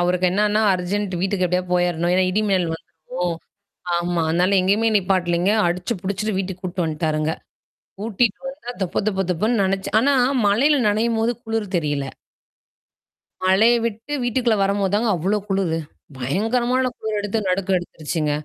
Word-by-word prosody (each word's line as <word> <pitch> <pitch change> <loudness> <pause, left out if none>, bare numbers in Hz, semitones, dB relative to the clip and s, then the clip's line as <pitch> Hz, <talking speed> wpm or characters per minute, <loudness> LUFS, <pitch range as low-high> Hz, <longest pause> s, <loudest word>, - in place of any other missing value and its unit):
அவருக்கு 180 +1 +1
என்னன்னா, 210 +2 +2
அர்ஜென்ட் 185 +1 -2
வீட்டுக்கு 190 -1 0
எப்டியாது 180 0 -1
போயிரணும். 175 -1 +1
ஏனா 185 0 +3
இடி 215 +3 +1
மின்னல் 180 -4 +1
வந்துரும் 170 +2 -5 0.6
ஆமா. 175 -1 -1
அதனால 180 +4 +2
எங்கேயுமே 210 +5 +2
நிப்பாட்டலைங்க. 185 -1 +1 0.2
அடிச்சு, 180 +6 -1
புடிச்சுட்டு 200 +1 -2
வீட்டுக்கு 190 -1 -4
கூட்டு 180 -1 -2
வந்துட்டாருங்க. 155 0 -1 0.7
கூட்டிட்டு 225 +2 0
வந்தா 270 -2 -7
தொப, 180 - -1
தொப 195 -2 0
தொபன்னு 215 +6 +1
நனச்சு 190 0 -1
ஆனா 280 +4 +3 0.3
மழையில 275 +9 +4
நனையும்போது 225 +2 +1
குளிர் 220 -3 -3
தெரியல. 145 -3 -1 1.4
மழைய 210 +6 +5
விட்டு 230 +5 -6
வீட்டுக்குள்ள 240 -2 +1
வரம்போது 200 0 +1
தாங்க, 225 +2 +1
அவ்ளோ 195 +6 0
குளுரு. 190 -4 0 0.4
பயங்கரமான 240 - 0
குளிர் 215 -1 -2
எடுத்து, 205 0 -2
நடுக்கம் 185 0 +1
எடுத்துருச்சுங்க. 155 -3 -3
195 Hz, 135 wpm, -21 LUFS, 175-215 Hz, 1.4 s, மழைய